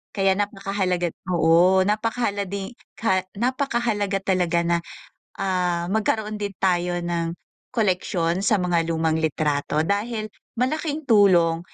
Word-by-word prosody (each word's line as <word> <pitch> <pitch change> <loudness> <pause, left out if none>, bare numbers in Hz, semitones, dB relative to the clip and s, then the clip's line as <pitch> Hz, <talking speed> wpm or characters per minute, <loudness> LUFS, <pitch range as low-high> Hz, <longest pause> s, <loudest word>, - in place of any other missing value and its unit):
Kaya 195 -2 +3
napakahalaga 195 -3 -1 0.2
oo, 175 +3 +5
napakahala 210 -1 -1
di 195 +3 -5 0.2
ka 190 -4 +1 0.2
napakahalaga 235 -5 0
talaga 175 -3 +1
na 170 0 +2 0.6
ah, 180 -3 0
magkaroon 215 0 -1
din 200 -1 -3
tayo 175 -1 0
ng 170 -1 -2 0.4
koleksyon 180 -5 0
sa 215 - +3
mga 175 -3 +1
lumang 160 -1 0
litrato, 150 -1 0
dahil 215 +4 -1 0.3
malaking 305 +3 -1
tulong 180 -7 +5
190 Hz, 115 wpm, -23 LUFS, 170-210 Hz, 0.6 s, oo